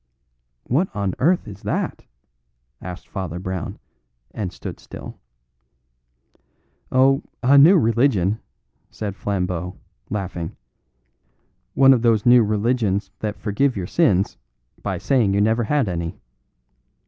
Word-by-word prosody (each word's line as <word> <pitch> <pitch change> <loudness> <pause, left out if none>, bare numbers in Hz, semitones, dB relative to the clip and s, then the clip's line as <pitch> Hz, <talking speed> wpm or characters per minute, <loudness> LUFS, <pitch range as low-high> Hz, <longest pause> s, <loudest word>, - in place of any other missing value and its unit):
"What 160 +10 +1
on 100 -3 -1
earth 175 +6 +2
is 100 -2 -10
that?" - - -3 0.8
asked 90 0 -8
Father 90 -3 -5
Brown, 95 -1 -5 0.5
and 100 -5 -4
stood - - -8
still. - - -10 1.7
"Oh, 135 +1 +4 0.2
a 135 +3 +5
new 160 +7 +8
religion," 115 - +2 0.5
said 105 -3 -5
Flambeau, 90 -3 -3 0.3
laughing; 90 -5 -4 1.2
"one 135 0 +7
of 125 - +1
those 115 -3 +2
new 120 -1 +7
religions 105 -2 0
that 105 -1 -3
forgive 120 +4 0
your 95 - -3
sins 100 - +2 0.4
by - - -2
saying 115 -8 +2
you - - +2
never 110 +2 +2
had 140 -1 +1
any. 85 -2 -4
105 Hz, 115 wpm, -22 LUFS, 95-130 Hz, 1.7 s, new